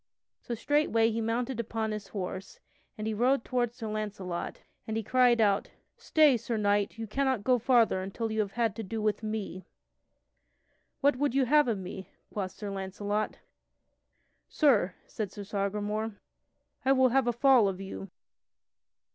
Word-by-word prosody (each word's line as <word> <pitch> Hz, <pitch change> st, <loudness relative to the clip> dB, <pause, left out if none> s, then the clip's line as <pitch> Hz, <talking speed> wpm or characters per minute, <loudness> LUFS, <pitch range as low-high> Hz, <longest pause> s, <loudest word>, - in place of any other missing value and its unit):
So 235 Hz, -, -5 dB
straightway 230 Hz, -3 st, +2 dB
he 225 Hz, +1 st, -1 dB
mounted 235 Hz, +2 st, -1 dB
upon 225 Hz, -1 st, -2 dB
his 210 Hz, -1 st, -5 dB
horse, 190 Hz, -1 st, -6 dB, 0.4 s
and 215 Hz, -, -4 dB
he 220 Hz, -, -1 dB
rode 245 Hz, +3 st, +2 dB
toward 245 Hz, -2 st, 0 dB
Sir 230 Hz, -3 st, -6 dB
Launcelot, 205 Hz, -5 st, -4 dB, 0.2 s
and 220 Hz, 0 st, -2 dB
he 225 Hz, -, -2 dB
cried 245 Hz, +2 st, +4 dB
out: 200 Hz, -3 st, +2 dB, 0.3 s
"Stay, 300 Hz, -5 st, +4 dB
Sir 230 Hz, 0 st, -3 dB
Knight, 205 Hz, 0 st, +1 dB
you 225 Hz, -, -4 dB
cannot 260 Hz, 0 st, 0 dB
go 250 Hz, +1 st, +3 dB
farther 230 Hz, -5 st, +3 dB
until 215 Hz, +4 st, -3 dB
you 220 Hz, -, -1 dB
have 200 Hz, -2 st, -1 dB
had 225 Hz, -3 st, 0 dB
to 225 Hz, -, -3 dB
do 220 Hz, +3 st, -4 dB
with 215 Hz, 0 st, 0 dB
me." 215 Hz, -4 st, -4 dB, 1.4 s
"What 285 Hz, -2 st, +3 dB
would 280 Hz, -2 st, 0 dB
you 270 Hz, -1 st, +4 dB
have 295 Hz, +3 st, +4 dB
of 225 Hz, -3 st, 0 dB
me?" 190 Hz, 0 st, -7 dB, 0.2 s
quoth 190 Hz, -3 st, -3 dB
Sir 205 Hz, -2 st, -6 dB
Launcelot. 200 Hz, +2 st, -3 dB, 1.1 s
"Sir," 215 Hz, -, +3 dB
said 210 Hz, -4 st, -5 dB
Sir 205 Hz, -, -7 dB
Sagramore, 210 Hz, +2 st, -2 dB, 0.7 s
"I 270 Hz, -, +4 dB
will 260 Hz, -1 st, +4 dB
have 265 Hz, 0 st, +2 dB
a -, -, +4 dB
fall 240 Hz, -2 st, +5 dB
of 190 Hz, -1 st, -3 dB
you." 195 Hz, 0 st, -7 dB
220 Hz, 165 wpm, -29 LUFS, 205-245 Hz, 1.4 s, fall